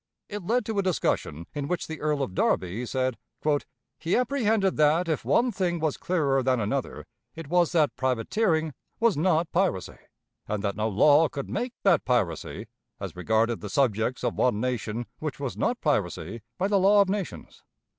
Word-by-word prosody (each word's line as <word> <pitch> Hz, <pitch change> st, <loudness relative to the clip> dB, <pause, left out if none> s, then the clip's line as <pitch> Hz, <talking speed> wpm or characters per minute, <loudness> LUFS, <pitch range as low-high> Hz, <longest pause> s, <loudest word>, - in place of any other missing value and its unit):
It 210 Hz, 0 st, -5 dB
led 235 Hz, +5 st, +1 dB
to 220 Hz, -2 st, -1 dB
a -, -, +4 dB
discussion 155 Hz, -, -1 dB
in 145 Hz, -1 st, -3 dB
which 180 Hz, +2 st, -2 dB
the 160 Hz, -1 st, -7 dB
Earl 150 Hz, -2 st, 0 dB
of 95 Hz, -, -4 dB
Derby 95 Hz, +6 st, 0 dB
said: 130 Hz, -1 st, -1 dB, 0.8 s
"He 165 Hz, +2 st, 0 dB
apprehended 225 Hz, -7 st, +1 dB
that, 155 Hz, +4 st, +3 dB
if 160 Hz, -3 st, -1 dB
one 245 Hz, +1 st, +2 dB
thing 180 Hz, -4 st, -1 dB
was 155 Hz, -2 st, 0 dB
clearer 145 Hz, -7 st, +1 dB
than 130 Hz, -1 st, +1 dB
another, 105 Hz, -1 st, -2 dB, 0.3 s
it 165 Hz, -3 st, -8 dB
was 175 Hz, -1 st, +3 dB
that 155 Hz, -4 st, +2 dB
privateering 155 Hz, -, 0 dB, 0.3 s
was 230 Hz, -4 st, +3 dB
not 165 Hz, +1 st, +1 dB
piracy; 180 Hz, -, -1 dB, 0.5 s
and 105 Hz, -1 st, -2 dB
that 100 Hz, -1 st, -1 dB
no 110 Hz, +2 st, 0 dB
law 145 Hz, +9 st, +5 dB
could 140 Hz, -2 st, -6 dB
make 245 Hz, 0 st, -2 dB
that 185 Hz, -6 st, +4 dB
piracy, 105 Hz, -, -1 dB, 0.3 s
as -, -, -6 dB
regarded 110 Hz, +5 st, +1 dB
the 105 Hz, -, -6 dB
subjects 120 Hz, +1 st, 0 dB
of -, -, 0 dB
one 125 Hz, -5 st, +1 dB
nation 120 Hz, -1 st, -2 dB
which 155 Hz, -3 st, -4 dB
was 130 Hz, -8 st, -3 dB
not 240 Hz, -, 0 dB
piracy 105 Hz, -, -1 dB, 0.2 s
by 190 Hz, -, +1 dB
the 200 Hz, -1 st, +3 dB
law 200 Hz, +2 st, +6 dB
of -, -, -8 dB
nations. 195 Hz, -3 st, -5 dB
150 Hz, 175 wpm, -26 LUFS, 115-185 Hz, 0.8 s, law